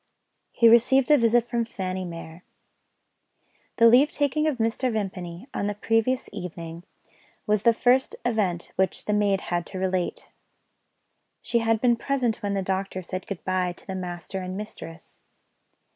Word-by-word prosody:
He 235 Hz, -, +4 dB
received 245 Hz, +4 st, +5 dB
a 295 Hz, -, +8 dB
visit 235 Hz, 0 st, +3 dB
from 235 Hz, -1 st, 0 dB
Fanny 185 Hz, -4 st, -4 dB
Mere. 165 Hz, 0 st, -9 dB, 1.3 s
The 230 Hz, -, +4 dB
leave 250 Hz, +6 st, +6 dB
taking 300 Hz, +2 st, 0 dB
of 295 Hz, -5 st, 0 dB
Mr. 230 Hz, +3 st, 0 dB
Vimpany, 190 Hz, -3 st, -4 dB
on 200 Hz, -, -1 dB
the 205 Hz, -, -2 dB
previous 225 Hz, +4 st, 0 dB
evening, 170 Hz, -3 st, -7 dB, 0.6 s
was 210 Hz, -1 st, +2 dB
the 235 Hz, -, +5 dB
first 255 Hz, +3 st, +2 dB
event 200 Hz, -8 st, 0 dB
which 190 Hz, 0 st, +1 dB
the 210 Hz, -, 0 dB
maid 200 Hz, -2 st, +2 dB
had 175 Hz, -1 st, -2 dB
to 190 Hz, -, -6 dB
relate. 185 Hz, -1 st, -2 dB, 1.1 s
She 235 Hz, -, +1 dB
had 225 Hz, -1 st, +1 dB
been 240 Hz, 0 st, +3 dB
present 250 Hz, -4 st, 0 dB
when 200 Hz, -1 st, -3 dB
the 195 Hz, -, -1 dB
doctor 190 Hz, 0 st, -3 dB
said 185 Hz, +1 st, -6 dB
good 200 Hz, -4 st, -6 dB
bye 185 Hz, -1 st, 0 dB
to -, -, -16 dB
the 190 Hz, -, -5 dB
master 180 Hz, 0 st, -5 dB
and 185 Hz, 0 st, -5 dB
mistress. 170 Hz, -5 st, -9 dB
205 Hz, 160 wpm, -25 LUFS, 185-235 Hz, 1.3 s, a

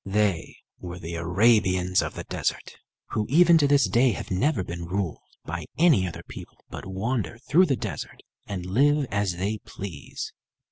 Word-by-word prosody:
They 100 Hz, -4 st, 0 dB, 0.2 s
were 90 Hz, 0 st, -7 dB
the 85 Hz, -1 st, -7 dB
Arabians 95 Hz, +1 st, +3 dB
of -, -, -4 dB
the -, -, -5 dB
desert, -, -, -3 dB, 0.3 s
who 105 Hz, -1 st, -1 dB
even 170 Hz, +3 st, +6 dB
to 145 Hz, -, +4 dB
this 140 Hz, -5 st, +4 dB
day 120 Hz, +5 st, +3 dB
have -, -, -7 dB
never 100 Hz, +3 st, +1 dB
been 85 Hz, -1 st, -6 dB
ruled 95 Hz, -2 st, -2 dB, 0.3 s
by 85 Hz, -1 st, -4 dB
any 155 Hz, -, +4 dB
other 85 Hz, -, -7 dB
people, -, -, -10 dB
but -, -, -7 dB
wander 100 Hz, 0 st, -2 dB
through 180 Hz, +6 st, +5 dB
the 135 Hz, -, +2 dB
desert, -, -, -6 dB, 0.3 s
and 95 Hz, -3 st, -4 dB
live 140 Hz, +9 st, +3 dB
as 100 Hz, -2 st, 0 dB
they 105 Hz, +4 st, -2 dB
please. 90 Hz, -9 st, -7 dB
100 Hz, 170 wpm, -26 LUFS, 90-130 Hz, 0.3 s, even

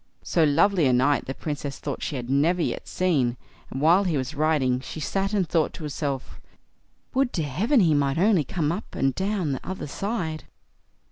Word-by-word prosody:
So 165 Hz, -, +2 dB
lovely 165 Hz, +2 st, +4 dB
a 130 Hz, -, +3 dB
knight 140 Hz, +4 st, +2 dB
the 135 Hz, -, -5 dB
Princess 145 Hz, -2 st, -4 dB
thought -, -, -5 dB
she 150 Hz, -, -3 dB
had 125 Hz, -2 st, -4 dB
never 150 Hz, +7 st, +2 dB
yet -, -, -3 dB
seen; 140 Hz, -10 st, +1 dB, 0.3 s
and 135 Hz, -, -5 dB
while 170 Hz, +7 st, +5 dB
he 170 Hz, -6 st, 0 dB
was 130 Hz, +2 st, -3 dB
riding, 145 Hz, -4 st, +1 dB
she 135 Hz, -, -8 dB
sat 195 Hz, +6 st, -1 dB
and 195 Hz, -5 st, +1 dB
thought 160 Hz, -1 st, +1 dB
to 165 Hz, -, -9 dB
herself: 140 Hz, -2 st, -4 dB, 0.7 s
"Would 265 Hz, -1 st, +2 dB
to 165 Hz, -, -1 dB
heaven 210 Hz, -, +2 dB
he 165 Hz, -4 st, +4 dB
might 140 Hz, -1 st, +1 dB
only 190 Hz, -2 st, +4 dB
come 150 Hz, +2 st, -1 dB
up 185 Hz, +6 st, -6 dB
and 135 Hz, -1 st, +1 dB
down 190 Hz, -2 st, -1 dB
the 130 Hz, -, -3 dB
other 190 Hz, -, -5 dB
side." 165 Hz, -1 st, -3 dB
155 Hz, 195 wpm, -25 LUFS, 140-185 Hz, 0.7 s, while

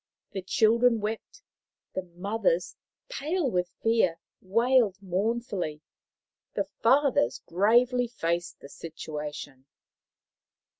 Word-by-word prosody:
The 195 Hz, -, -4 dB
children 230 Hz, +5 st, +3 dB
wept, 220 Hz, -, -5 dB, 0.5 s
the 190 Hz, -, -1 dB
mothers, 180 Hz, 0 st, -1 dB, 0.3 s
pale 335 Hz, -, -1 dB
with 180 Hz, -2 st, 0 dB
fear, 225 Hz, -7 st, +3 dB, 0.2 s
wailed 230 Hz, +1 st, +3 dB
mournfully, 195 Hz, -4 st, -2 dB, 0.7 s
the -, -, +1 dB
fathers 270 Hz, -, +2 dB
gravely 240 Hz, +7 st, +3 dB
faced 170 Hz, -7 st, -2 dB
the 140 Hz, -, -11 dB
situation. 150 Hz, -4 st, -7 dB
200 Hz, 90 wpm, -28 LUFS, 170-235 Hz, 0.7 s, children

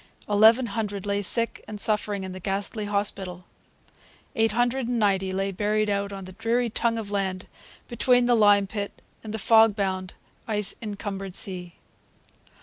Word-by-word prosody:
Eleven 220 Hz, +4 st, +5 dB
hundred 205 Hz, -3 st, -4 dB
lay 200 Hz, 0 st, 0 dB
sick 230 Hz, +4 st, +3 dB
and 210 Hz, -1 st, -7 dB
suffering 210 Hz, -2 st, 0 dB
in 190 Hz, -, -6 dB
the 185 Hz, -, -8 dB
ghastly 200 Hz, +3 st, -3 dB
hospital. 195 Hz, -3 st, -3 dB, 0.9 s
Eight 225 Hz, -1 st, +2 dB
hundred 245 Hz, +2 st, 0 dB
and 245 Hz, 0 st, -1 dB
ninety 195 Hz, -3 st, +1 dB
lay 195 Hz, +1 st, -1 dB
buried 210 Hz, +2 st, 0 dB
out 200 Hz, 0 st, -1 dB
on 195 Hz, -1 st, -7 dB
the 185 Hz, -, -10 dB
dreary 230 Hz, +4 st, -1 dB
tongue 230 Hz, +1 st, 0 dB
of 210 Hz, -2 st, -5 dB
land 190 Hz, -2 st, -2 dB, 0.4 s
between 245 Hz, +1 st, +2 dB
the 245 Hz, -, +3 dB
lime 205 Hz, -3 st, +5 dB
pit 200 Hz, +1 st, -6 dB, 0.2 s
and 215 Hz, -, -7 dB
the 220 Hz, -, -3 dB
fog 220 Hz, 0 st, +5 dB
bound, 190 Hz, -3 st, -3 dB, 0.3 s
ice 210 Hz, -3 st, 0 dB
encumbered 195 Hz, -3 st, -5 dB
sea. 180 Hz, -3 st, -2 dB
205 Hz, 160 wpm, -25 LUFS, 195-225 Hz, 0.9 s, Eleven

